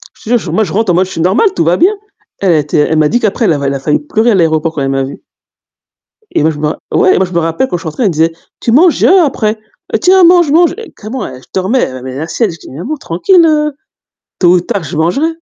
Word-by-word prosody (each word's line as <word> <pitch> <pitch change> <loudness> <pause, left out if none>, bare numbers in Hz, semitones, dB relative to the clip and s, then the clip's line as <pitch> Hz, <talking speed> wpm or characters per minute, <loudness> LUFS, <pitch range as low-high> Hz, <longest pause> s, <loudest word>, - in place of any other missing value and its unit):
Je 225 - -8
te 245 - +4
jure 170 -5 -6
moi 220 - +2
je 175 - -5
rentre 210 -3 +1
en - - +1
mode, 185 +1 +2
je 190 - -11
suis 165 - -4
normale, 210 - +2
tout 165 - +1
va 170 +2 +2
bien. 375 +5 +3 0.5
Elle, 195 - 0
elle - - +3
a - - +3
été, 150 +1 -2
elle 155 +2 +1
m'a 155 -1 +3
dit 240 - +1
qu'après 220 +2 0
elle 165 - +3
avait, 140 -1 -2
elle 140 - -1
a - - -4
failli 150 +2 0
pleurer 235 -5 0
à - - +2
l'aéroport 160 -2 +1
quand 140 - -4
elle 135 - -1
m'a 135 0 0
vue 135 - -8 1.1
Et - - 0
moi 160 - +2
je 145 - -8
me 150 +1 -1 0.2
ouais 185 - +4
et - - +1
moi 190 - +2
je 180 - -10
me 170 - +1
rappelle 165 +10 -1
quand 175 - -3
je - - -11
rentrée, 160 +10 -3
elle 200 - +3
me - - -3
disait: 165 +2 +1 0.3
«Tu 235 - -1
manges 320 +7 +4
après. 270 - +2 0.4
Tiens 370 0 +4
mange, 345 -3 +5
mange», 340 +2 +3 0.2
carrément, 230 +5 -6
eh 130 -1 -10
je - - -21
dormais, 190 - -1
mais 130 0 -7
la 155 +4 -4
sieste, 185 0 -1
je - - -13
dis: - - -11
«Maman 180 - -5
tranquille, 330 - +2
heu, 300 -2 +1 0.7
tôt 175 -1 +4
ou - - +3
tard 170 - -3
je 155 +1 -6
mangerai». 175 - +1
185 Hz, 285 wpm, -12 LUFS, 160-260 Hz, 1.1 s, mange